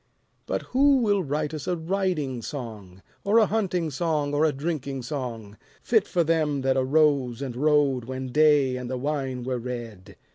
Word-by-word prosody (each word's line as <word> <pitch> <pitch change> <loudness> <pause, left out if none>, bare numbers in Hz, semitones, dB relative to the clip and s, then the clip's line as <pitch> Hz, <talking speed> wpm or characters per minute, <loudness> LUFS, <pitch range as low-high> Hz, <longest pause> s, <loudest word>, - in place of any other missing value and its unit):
But - - -2
who 275 +1 +5
will 205 -5 +2
write 150 -1 -2
us 155 -3 -6
a 180 - 0
riding 165 -7 -1
song, 110 -9 -8 0.2
Or 205 +3 +3
a 225 - +6
hunting 185 -7 -1
song 150 0 -1
or 150 +2 +3
a 155 - +3
drinking 140 -3 -4
song, 115 -7 -5 0.3
Fit 220 -4 +2
for 175 -2 +1
them 155 -3 +1
that 130 0 +1
arose 135 -2 +2
and 135 -4 -5
rode 140 -3 +2
When 130 0 -5
day 145 -3 +4
and 125 -1 -6
the 130 - -2
wine 135 -2 -3
were 125 0 -2
red? 115 -6 -7
145 Hz, 175 wpm, -25 LUFS, 125-160 Hz, 0.3 s, a